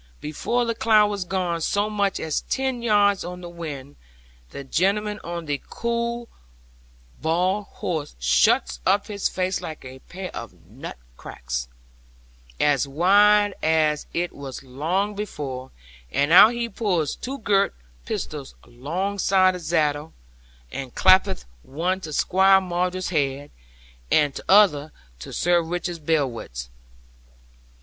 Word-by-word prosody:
Before 235 +11 -1
the 230 - 0
cloud 215 -2 +4
was 200 -3 -3
gone 175 -2 -1
so 205 +5 +1
much 200 -2 0
as 155 -2 -1
ten 265 -2 -1
yards 205 -3 +3
on 180 +1 -7
the 175 - -7
wind, 145 -5 -8 0.5
the 140 - -8
gentleman 205 +8 0
on 170 -1 -5
the 145 -2 -2
cue 235 - -3 0.9
bald 180 +6 +1
horse 155 - -4
shuts - - +2
up 200 - +2
his 205 -2 -2
face 185 0 -1
like 155 -4 -8
a 130 0 -10
pair 185 +6 -8
of - - -7
nut - - -9 0.2
cracks, - - -5 0.9
as 145 -2 +2
wide 205 +7 +4
as 155 -2 +1
it 175 0 -2
was 140 -2 -8
long 165 +11 -1
before, 140 -11 -5 0.4
and 145 - +1
out 210 +6 +9
he 235 0 -1
pulls 190 -8 -1
two 270 +2 -5
girt 200 -4 +1 0.3
pistols - - -5
longside 185 +7 +1
of 180 - -6
zaddle, 155 -2 0 0.6
and 135 -3 -6
clap'th 190 +1 +4 0.2
one 175 - -2
to 160 - -7
Squire 190 +5 +4
Maunder's 180 0 -2
head, 145 -3 -1 0.6
and 145 -2 +3
tother 155 -7 +4 0.3
to - - -9
Sir 175 0 +2
Richard 170 -1 -4
Blewitt's. 115 - -1
175 Hz, 130 wpm, -24 LUFS, 145-200 Hz, 0.9 s, out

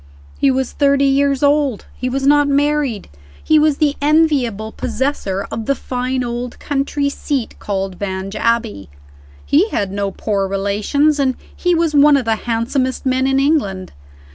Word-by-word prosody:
He 275 - +3
was 265 -1 0
thirty 280 -1 +2
years 275 0 +2
old; 285 -5 +1
he 255 - -3
was 270 +1 -2
not 290 0 +4
married; 285 -5 0 0.4
he 310 -1 +4
was 300 -2 +2
the 295 -2 +1
enviable 285 -8 +1
possessor 220 -6 -2
of 225 - -5
the 275 - +2
fine 255 0 -3
old 240 0 -5
country 280 0 -1
seat, 280 -3 -3
called 195 -2 -4
Vange 195 0 -4
Abbey; 225 - -1 0.6
he 345 +10 +3
had 200 - -2
no 200 0 -2
poor 195 0 -2
relations; 205 +10 0
and 260 -2 +1 0.2
he 355 -1 +1
was 330 -2 +1
one 290 0 +6
of 260 - -2
the 225 -1 +1
handsomest 255 +4 -1
men 260 0 +1
in 270 0 +2
England. 270 -11 0
265 Hz, 160 wpm, -18 LUFS, 220-285 Hz, 0.6 s, one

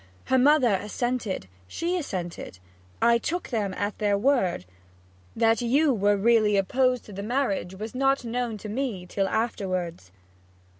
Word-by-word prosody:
Her 260 - +3
mother 265 -4 +5
assented; 210 - -2 0.2
she 340 - -2
assented. 180 - -5 0.5
I 235 0 +5
took 350 +8 -3
them 210 -5 -1
at 205 +1 -3
their 205 -1 +2
word. 200 - +1 0.7
That 225 0 +3
you 275 +5 +3
was 205 -2 +2
really 215 -1 +4
opposed 250 +5 +1
to 210 - -11
the 195 - -5
marriage 205 -5 -1
was 215 +3 -6
not 270 0 +1
known 235 -1 -2
to 210 - -8
me 215 -5 -3
till 195 +2 -1
afterwards.' 185 - -2
225 Hz, 145 wpm, -26 LUFS, 200-255 Hz, 0.7 s, mother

